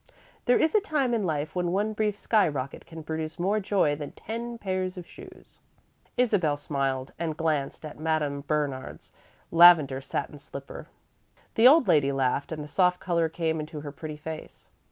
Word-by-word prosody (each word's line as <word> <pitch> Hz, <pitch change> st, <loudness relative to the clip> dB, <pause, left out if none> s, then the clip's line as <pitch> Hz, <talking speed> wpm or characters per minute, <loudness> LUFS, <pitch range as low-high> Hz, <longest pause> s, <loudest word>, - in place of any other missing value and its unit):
There 245 Hz, -, +4 dB
is 315 Hz, 0 st, +2 dB
a 430 Hz, -, +4 dB
time 290 Hz, -10 st, 0 dB
in 230 Hz, -, +1 dB
life 150 Hz, -1 st, -2 dB
when 175 Hz, -1 st, 0 dB
one 205 Hz, +4 st, 0 dB
brief 210 Hz, -1 st, -1 dB
sky 210 Hz, -3 st, +3 dB
rocket 140 Hz, -3 st, -5 dB
can 160 Hz, -1 st, -9 dB
produce 160 Hz, 0 st, -4 dB
more 195 Hz, +5 st, +1 dB
joy 190 Hz, -7 st, +1 dB
than 145 Hz, -1 st, -7 dB
ten 235 Hz, +2 st, -6 dB
pairs 185 Hz, -3 st, -3 dB
of 180 Hz, -, -7 dB
shoes." 370 Hz, -, -15 dB, 0.6 s
Isabel 195 Hz, -12 st, +2 dB
smiled 135 Hz, -2 st, -2 dB
and 160 Hz, -2 st, -2 dB
glanced 155 Hz, -2 st, -1 dB
at 150 Hz, -, -9 dB
Madame 155 Hz, -3 st, -1 dB
Bernard's 145 Hz, -4 st, -3 dB, 0.4 s
lavender 165 Hz, -6 st, +7 dB
satin 145 Hz, +2 st, -4 dB
slipper. 140 Hz, -1 st, -9 dB, 0.7 s
The 225 Hz, +2 st, +6 dB
old 295 Hz, +1 st, +6 dB
lady 140 Hz, -3 st, +4 dB
laughed 135 Hz, +2 st, 0 dB
and 155 Hz, -2 st, -4 dB
the -, -, -8 dB
soft 180 Hz, +4 st, +2 dB
colour 170 Hz, -2 st, 0 dB
came 160 Hz, -1 st, -1 dB
into 150 Hz, 0 st, -6 dB
her 145 Hz, -1 st, -7 dB
pretty 155 Hz, +1 st, -7 dB
face. 155 Hz, +1 st, -9 dB
160 Hz, 175 wpm, -27 LUFS, 145-195 Hz, 0.7 s, lavender